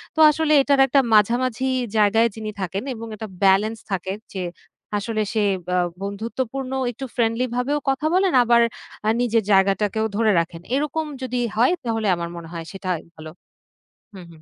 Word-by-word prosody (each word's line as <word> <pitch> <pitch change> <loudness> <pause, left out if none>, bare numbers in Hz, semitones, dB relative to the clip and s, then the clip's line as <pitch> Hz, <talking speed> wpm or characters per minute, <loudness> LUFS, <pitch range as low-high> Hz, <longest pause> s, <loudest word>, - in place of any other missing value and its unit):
তো - - -3
আসলে 310 0 +1
এটার 280 0 +2
একটা 275 +2 +4
মাঝামাঝি 240 +4 +2 0.3
জায়গায় 215 +2 +4
যিনি 215 -1 -5
থাকেন 190 +3 -3
এবং 230 -1 -8
একটা 220 +1 -7 0.2
বেলেন্স 200 +3 +3
থাকে 190 0 -2 0.2
যে 190 -2 -3 0.5
আসলে 215 +1 -2
সে 215 -2 +1 0.2
ব্য 180 - -2 0.3
বন্ধুত্বপূর্ণ 230 +6 -4 0.2
একটু 265 +3 -7
ফ্রেন্ডলি 230 +1 +1
ভাবেও 270 +4 0
কথা 270 +3 -1
বলেন, 375 0 +3
আবার 235 0 +4 0.5
আ - - +4
নিজের 230 -2 +2
জায়গাটাকেও 200 +2 +2
ধরে 220 -1 +3
রাখেন। 165 0 -4
এরকম 300 +2 -1 0.2
যদি 250 -1 -2 0.2
হয় 245 +9 +4
তাহলে 225 -2 -1
আমার 170 0 -4
মনে 170 -1 -8
হয় 165 -1 -6
সেটাই 185 -4 -3
ভালো 155 0 -9 0.8
হুম, 185 -2 -10
হুম। 160 -1 -17
225 Hz, 160 wpm, -22 LUFS, 195-255 Hz, 0.8 s, একটা